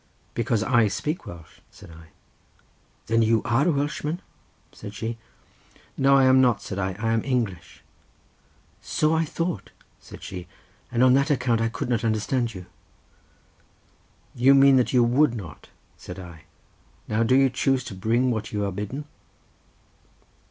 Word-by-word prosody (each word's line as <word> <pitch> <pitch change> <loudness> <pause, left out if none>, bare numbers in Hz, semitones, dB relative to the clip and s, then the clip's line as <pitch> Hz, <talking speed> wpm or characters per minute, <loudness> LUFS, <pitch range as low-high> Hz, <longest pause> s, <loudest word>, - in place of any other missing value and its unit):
"Because 115 -2 0
I 120 -2 +3
speak 150 - -3
Welsh," 85 -2 -12
said - - -15
I. 80 0 -14 1.0
"Then 115 +1 +2
you 110 0 +2
are 130 +6 +2
a - - +4
Welshman?" 150 +3 -2 0.5
said 100 +1 -10
she. 115 +2 -4 0.8
"No 140 0 +4
I 135 - +5
am 130 0 +5
not," 120 -5 +3
said 100 - -6
I, 95 -1 -1
"I 115 +1 -1
am 115 - 0
English." 120 -9 -3 1.0
"So 155 +1 0
I 160 0 +1
thought," 165 +3 -4 0.3
said - - -13
she, 90 -2 -7 0.4
"and 120 +1 +2
on 130 -1 +6
that 140 +3 +2
account 125 -5 +1
I 115 - +1
could 115 - -5
not 120 -2 0
understand 115 +1 -1
you." 90 -1 -8 1.7
"You 130 +3 +5
mean 135 -1 +6
that 125 - +1
you 125 -2 +4
would 120 +2 +3
not," 95 -8 -9 0.3
said - - -9
I. 85 -3 -11 0.6
"Now 110 +1 0
do 120 +3 +3
you 135 -1 +4
choose 130 +1 0
to - - -8
bring 115 +6 +1
what 110 -2 -4
you 105 -1 -1
are 100 - -2
bidden?" 105 +10 -5
120 Hz, 160 wpm, -24 LUFS, 105-135 Hz, 1.7 s, on